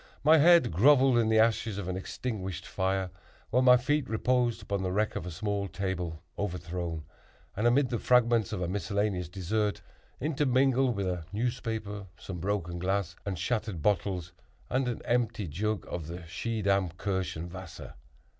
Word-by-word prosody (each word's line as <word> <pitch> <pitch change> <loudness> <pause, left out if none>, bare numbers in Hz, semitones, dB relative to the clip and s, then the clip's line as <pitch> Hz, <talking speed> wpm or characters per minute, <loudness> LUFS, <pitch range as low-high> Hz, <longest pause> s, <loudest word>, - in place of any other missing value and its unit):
My 155 +2 +7
head 170 - +6
grovelled 130 - +5
in 110 -1 +2
the 110 - +4
ashes 110 -1 +2
of 100 -3 -4
an 95 - -2
extinguished 95 -2 -4
fire, 95 -1 -1 0.4
while 125 - +4
my 125 -1 +7
feet 145 +4 0
reposed 120 +1 +1
upon 100 -1 -2
the 95 -1 -1
wreck 105 +3 0
of 85 - -4
a - - -3
small 100 +3 -2
table, 90 -3 -4 0.2
overthrown, 85 -4 -3 0.5
and 110 +4 +2
amid 130 +2 +3
the 120 - 0
fragments 120 -4 +3
of 90 - -2
a - - -1
miscellaneous 95 -1 -1
dessert, 100 +3 -1 0.4
intermingled 135 -3 +2
with 100 -1 -1
a 90 -3 -2
newspaper, 110 -3 -3
some 90 -3 -7
broken 90 -2 -2
glass 95 0 -1
and 95 -2 -2
shattered 110 -7 -2
bottles, 95 -3 0 0.4
and 130 0 +1
an 120 - -3
empty 115 -4 0
jug 105 +7 -2
of 80 -3 -5
the 85 +1 -7
Schiedam 100 +1 0
Kirschenwasser. 95 -2 -4
100 Hz, 155 wpm, -29 LUFS, 90-120 Hz, 0.5 s, My